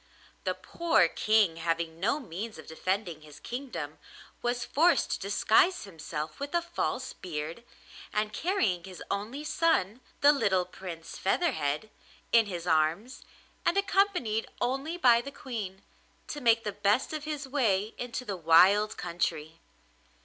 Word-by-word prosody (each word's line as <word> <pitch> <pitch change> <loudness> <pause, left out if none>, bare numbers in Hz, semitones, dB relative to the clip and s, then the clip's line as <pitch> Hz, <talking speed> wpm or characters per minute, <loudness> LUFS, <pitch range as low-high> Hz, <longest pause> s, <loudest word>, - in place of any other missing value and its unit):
The - - 0
poor 335 - +2
King, 210 -2 +2
having 165 0 -2
no 220 - +1
means 215 - -6
of 155 - -11
defending 175 0 -2
his 150 -1 -13
kingdom, 255 +2 -6 0.4
was 240 0 -1
forced 335 +4 +3
to - - -1
disguise 220 - +3
himself 155 -5 -6
with 285 +4 -4
a 345 - +3
false 340 -6 -3
beard, 165 +4 -6 0.5
and 210 0 -1
carrying 210 - 0
his 185 -1 -9
only 220 +9 -3
son, 260 - +1 0.2
the 285 - +8
little 190 -10 +2
Prince 180 -3 -8
Featherhead, 190 - 0 0.4
in 230 -2 +5
his 175 -3 -5
arms, 165 - +1 0.4
and 345 - +2
accompanied 385 - +1
only 275 +7 -1
by 240 -7 +5
the 275 - -7
Queen, 215 -9 -6 0.5
to 295 - -5
make 230 -2 +4
the 210 - -2
best 205 +8 +1
of 305 -1 -4
his 295 -2 -4
way 225 -6 +1
into 245 +1 -4
the 200 - -3
wild 185 +5 +5
country. 165 -2 -3
210 Hz, 140 wpm, -29 LUFS, 175-265 Hz, 0.5 s, the